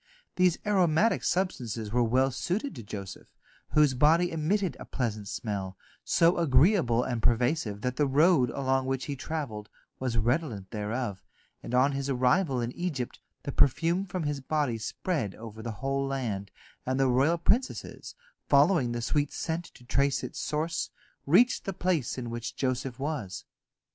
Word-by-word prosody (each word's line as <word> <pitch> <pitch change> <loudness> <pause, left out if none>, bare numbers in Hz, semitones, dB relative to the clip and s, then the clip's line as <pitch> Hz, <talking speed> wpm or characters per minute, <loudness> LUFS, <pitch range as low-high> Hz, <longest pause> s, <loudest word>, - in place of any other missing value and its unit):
These 180 -2 +3
aromatic 190 0 +3
substances 120 - -1
were 120 +2 +2
well 130 +3 +2
suited 195 - -2
to - - -8
Joseph, 100 -2 -8 0.5
whose 150 -3 +5
body 160 +7 +4
emitted 175 +4 0
a - - -8
pleasant 110 -5 -3
smell, 95 -1 -4 0.3
so 170 +1 +3
agreeable 140 - +4
and 120 -3 -2
pervasive 120 -2 +1
that 125 +1 -2
the 145 - +3
road 145 -1 +4
along 130 0 0
which 135 0 -1
he 145 - -3
travelled 125 -8 -5 0.3
was 125 -3 -1
redolent 115 - -1
thereof, 105 -1 -3 0.4
and 125 - -4
on 130 +3 +4
his 140 0 -3
arrival 130 +3 +2
in 120 0 -2
Egypt 145 -6 -4 0.2
the 140 - -3
perfume 170 +9 +2
from 180 -2 -3
his 145 -1 -2
body 135 -4 -1
spread 110 - -2
over 110 -1 -9
the 115 - -5
whole 135 +4 -2
land, 110 -8 -3 0.3
and 130 +1 -1
the 135 - +4
royal 135 +7 +3
princesses, 230 +10 -1 0.3
following 140 -3 +4
the 120 -1 -3
sweet 145 +3 0
scent 165 +1 -3
to - - -16
trace 140 +3 +1
its - - -6
source, 160 +2 -2 0.4
reached 225 - +4
the 195 - -2
place 175 -9 -1
in 120 -2 -5
which 115 -1 -5
Joseph 130 -1 -2
was. 135 -10 -4
135 Hz, 160 wpm, -28 LUFS, 120-160 Hz, 0.5 s, whose